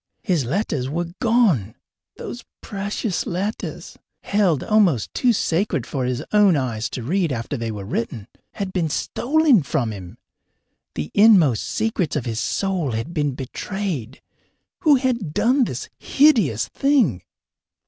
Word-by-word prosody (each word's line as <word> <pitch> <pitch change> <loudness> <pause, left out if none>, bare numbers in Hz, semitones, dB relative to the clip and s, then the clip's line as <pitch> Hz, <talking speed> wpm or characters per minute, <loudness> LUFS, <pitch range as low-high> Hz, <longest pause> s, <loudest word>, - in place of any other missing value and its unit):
His 170 -8 +1
letters 140 - -1
were 170 +3 -3
gone 220 - +2 0.4
those 240 - -7 0.2
precious 205 -1 -3
letters, 195 +5 -4 0.2
held 195 -8 +1
almost 190 - +2
too 250 - +3
sacred 175 - 0
for 130 -3 -3
his 125 -1 -2
own 205 -6 +5
eyes 120 -4 -2
to 125 - -5
read 170 +4 0
after 120 +3 -3
they 115 -3 -3
were 105 -3 -6
written 110 0 -4 0.3
had 195 -2 -4
been 170 -4 0
stolen 280 - +2
from 120 -5 -1
him! 90 -3 -10 0.8
The 75 -1 -4
inmost 190 - +5
secrets 215 -8 -1
of 145 - -2
his 115 -2 -2
soul 175 - -1
had 115 +10 -4
been 145 -5 -1
betrayed. 135 - -5 0.6
Who 305 -3 +5
had 245 - -1
done 255 +2 +3
this - - -5
hideous 225 - +3
thing? 260 - +2
170 Hz, 140 wpm, -22 LUFS, -, 0.8 s, own